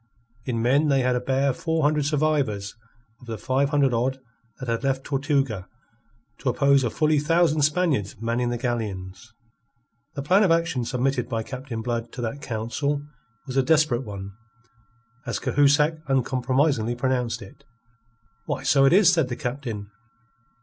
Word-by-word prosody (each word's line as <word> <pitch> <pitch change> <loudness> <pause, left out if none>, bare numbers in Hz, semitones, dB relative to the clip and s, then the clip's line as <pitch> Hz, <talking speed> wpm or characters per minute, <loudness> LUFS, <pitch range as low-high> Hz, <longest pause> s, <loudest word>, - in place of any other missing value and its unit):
In 115 -3 -1
men 140 +6 +3
they 135 -2 +3
had 125 0 +1
a - - +1
bare 135 +2 +1
four 160 +4 -1
hundred 150 0 +2
survivors 140 -10 0 0.4
of 125 - -16
the 115 -1 -4
five 130 +6 0
hundred 140 -3 +2
odd 130 +3 0 0.4
that 130 - -6
had 115 +2 -1
left 135 -1 0
Tortuga, 135 - -1 0.7
to 135 - -1
oppose 140 +2 +3
to 120 - 0
fully 155 +4 +1
a - - +1
thousand 160 0 +2
Spaniards 145 - +1
manning 115 +2 -1
the 120 - -2
galleons. 110 -4 -4 0.8
The 140 - -4
plan 185 +7 +4
of 200 - +4
action 165 -7 +1
submitted 125 0 -1
by 115 -2 -2
Captain 125 -2 -6
Blood 115 -1 -3
to 125 - -6
that 120 +5 -4
council 140 +6 -2 0.4
was 135 -1 -5
a - - +6
desperate 150 -3 +2
one, 100 -3 -7 1.0
as - - -1
Cahusac 150 +2 +3
uncompromisingly 130 -1 +1
pronounced 125 -2 -1
it. 140 +1 -15 0.8
"Why, - - -3
so 135 -1 +4
it 135 - +5
is," 190 -2 +6
said 160 -7 +1
the 125 - -3
Captain. 120 -5 -5
130 Hz, 160 wpm, -24 LUFS, 120-145 Hz, 1.0 s, a